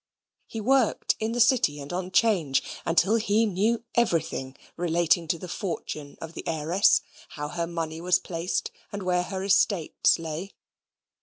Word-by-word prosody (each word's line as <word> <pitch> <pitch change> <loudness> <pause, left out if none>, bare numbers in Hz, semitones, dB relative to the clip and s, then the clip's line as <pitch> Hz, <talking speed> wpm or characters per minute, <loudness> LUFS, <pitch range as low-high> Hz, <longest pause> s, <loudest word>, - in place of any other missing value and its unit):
He 225 - -6
worked 255 +1 +2
in 220 +1 -1
the 240 - -2
City 235 - +3
and 145 +4 -7
on 180 0 -3
'Change, 185 - +2 0.2
until 185 +6 +3
he 220 0 +2
knew 215 +4 0
everything 165 - 0 0.2
relating 170 0 +1
to 170 - 0
the 180 - -8
fortune 165 -6 -5
of 165 0 -8
the - - -7
heiress, 165 +5 +3 0.4
how 150 0 -4
her 170 0 -3
money 165 -1 -4
was 180 +1 +3
placed, 170 0 -3 0.2
and 200 -1 -5
where 180 -1 +1
her 190 +1 -4
estates 195 -3 +3
lay. 165 +4 -6
180 Hz, 155 wpm, -26 LUFS, 165-205 Hz, 0.4 s, City